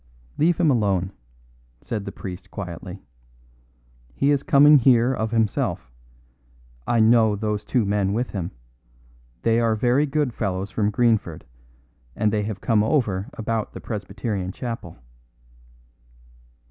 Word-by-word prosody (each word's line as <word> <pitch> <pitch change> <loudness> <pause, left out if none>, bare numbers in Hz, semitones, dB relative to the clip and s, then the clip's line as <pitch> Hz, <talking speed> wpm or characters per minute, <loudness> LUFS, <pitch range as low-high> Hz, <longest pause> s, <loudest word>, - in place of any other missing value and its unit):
"Leave 165 +2 +3
him 165 -4 +3
alone," 100 -6 +1 0.7
said 105 - -5
the - - -5
priest 90 -1 -8
quietly. 90 0 -7 1.1
"He 140 - +2
is 140 -2 +2
coming 145 +1 +6
here 125 0 +4
of 110 -3 -2
himself. 110 - -1 1.0
I 120 - +2
know 110 -1 +4
those 105 0 -2
two 120 -4 0
men 100 -1 0
with 120 +4 -2
him. 90 -4 -3 0.9
They 115 0 +3
are 115 -2 +2
very 125 +6 +2
good 145 -3 -1
fellows 100 -2 -3
from 105 -1 0
Greenford, 110 -7 0 0.7
and 105 0 +1
they 105 - +1
have 105 -1 -5
come 110 -3 +2
over 110 -5 0
about 110 0 -3
the - - -7
Presbyterian 100 -3 -4
chapel." 115 -6 -6
110 Hz, 130 wpm, -23 LUFS, 100-120 Hz, 1.1 s, coming